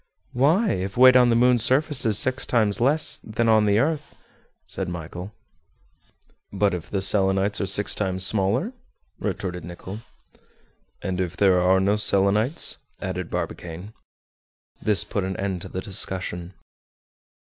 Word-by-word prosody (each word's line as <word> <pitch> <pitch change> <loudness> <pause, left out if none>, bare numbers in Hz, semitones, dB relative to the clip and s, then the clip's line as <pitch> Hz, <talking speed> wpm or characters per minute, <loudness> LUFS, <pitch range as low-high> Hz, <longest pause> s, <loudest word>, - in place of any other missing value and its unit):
"Why? 160 - +3
if 95 +3 -3
weight 130 0 +7
on 125 -1 +6
the 115 - +3
moon's 120 -1 +3
surface 135 +1 +2
is 105 -2 +2
six 130 +3 +1
times 110 -4 +1
less 145 +6 +2
than 115 +1 -2
on 110 -1 +4
the 100 0 +3
earth?" 150 +4 -1 0.5
said 95 -2 -5
Michel. 90 +3 -7 1.2
"But 100 0 +1
if 85 -2 -6
the 95 -2 -1
Selenites 95 +1 +2
are 100 - -1
six 100 +3 +1
times 95 -2 -1
smaller?" 110 - 0 0.5
retorted 90 -2 -4
Nicholl. 90 +4 -8 1.0
"And 95 -1 -2
if 90 -1 -4
there 95 -3 +4
are 95 +1 +4
no 100 +2 +2
Selenites?" 105 - +2 0.2
added 90 -2 -4
Barbicane. 90 +5 -6 0.9
This 105 -2 +1
put 100 - -3
an 95 0 -4
end 95 -3 -3
to - - -9
the 95 - -5
discussion. 95 -2 -3
100 Hz, 145 wpm, -24 LUFS, 95-120 Hz, 1.2 s, weight